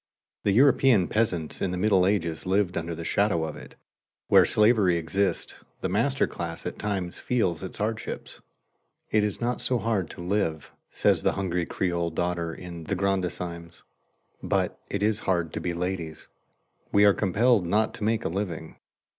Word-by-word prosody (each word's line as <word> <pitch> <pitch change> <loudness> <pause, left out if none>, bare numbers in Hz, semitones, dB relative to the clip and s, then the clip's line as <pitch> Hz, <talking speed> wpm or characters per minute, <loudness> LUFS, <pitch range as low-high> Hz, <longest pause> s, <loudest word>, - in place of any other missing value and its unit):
The 100 - +4
European 130 -4 +5
peasants 95 -8 -1
in - - +1
the 90 - -3
Middle 95 -1 +3
Ages 85 -5 -1
lived 95 -1 +1
under 85 0 -3
the 85 0 -7
shadow 100 -4 +1
of 80 -1 -4
it. - - -12 0.5
Where - - +7
slavery 105 -5 +4
exists 95 +4 -1 0.2
the - - -1
master - - +2
class - - -6
at - - -5
times 95 -4 -3
feels 100 -10 0
its 95 - -5
hardships. 110 +2 -4 0.7
"It 105 -1 +3
is 105 -1 -2
not 120 +1 -1
so 125 0 +2
hard 110 -7 -1
to 90 - -9
live," 85 -4 -1 0.2
says - - +2
the - - +2
hungry 90 -3 -2
Creole 85 -2 -1
daughter 85 0 -2
in 85 -1 -8
"The 100 - -1
Grandissimes," 90 -3 -3 0.6
"but - - -1
it 100 0 -2
is 110 0 +2
hard 85 -3 0
to - - -3
be 90 - -1
ladies.... 85 -3 -4 0.6
We 100 0 +5
are 100 - +7
compelled 105 0 +2
not 110 +4 +1
to - - -7
make 110 +1 0
a - - +1
living. 85 -3 -4
95 Hz, 170 wpm, -26 LUFS, 85-105 Hz, 0.7 s, Where